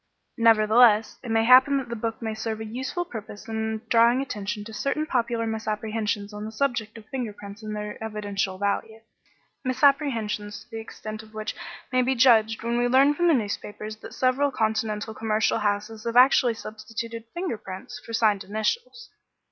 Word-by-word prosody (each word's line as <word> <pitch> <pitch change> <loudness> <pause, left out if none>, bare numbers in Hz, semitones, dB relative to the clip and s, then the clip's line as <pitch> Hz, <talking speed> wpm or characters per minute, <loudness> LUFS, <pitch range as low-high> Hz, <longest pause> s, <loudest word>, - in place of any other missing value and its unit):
Nevertheless 225 0 +5
it 245 - -8
may 225 0 +3
happen 260 +3 +7
that 265 -2 -3
the 235 - -3
book 225 +1 -4
may 220 -1 -2
serve 220 0 -4
a 220 - -5
useful 260 +10 -3
purpose 220 -4 -9
in 220 0 -2
drawing 235 +2 +5
attention 210 -6 -4
to 220 +1 -10
certain 275 +6 -1
popular 235 -4 0
misapprehensions 215 -1 -2
on 210 0 -6
the 215 - -5
subject 230 -3 -1
of 220 - -12
finger 250 -5 -3
prints 205 +1 -11
and 215 -1 -5
their 210 +1 -6
evidential 205 -3 -3
value; 205 +3 -2 0.6
misapprehensions 235 -7 +1
the 225 - -5
extent 215 -1 -7
of 220 0 -17
which 215 0 -4 0.4
may 255 0 +3
be 260 +1 +1
judged 225 -3 +4
when 235 +1 0
we 245 - +2
learn 270 +4 +5
from 345 +4 +1
the 330 - +5
newspapers 215 -1 -4
that - - -11
several 260 +3 +2
Continental 220 -2 -1
commercial 220 0 +1
houses 210 +1 -2
have 230 +1 0
actually 250 -2 +6
substituted 225 +1 -7
finger 345 - -3
prints 190 0 -8
for - - -10
signed 215 -3 +2
initials. 465 - -3
220 Hz, 170 wpm, -25 LUFS, 215-245 Hz, 0.6 s, happen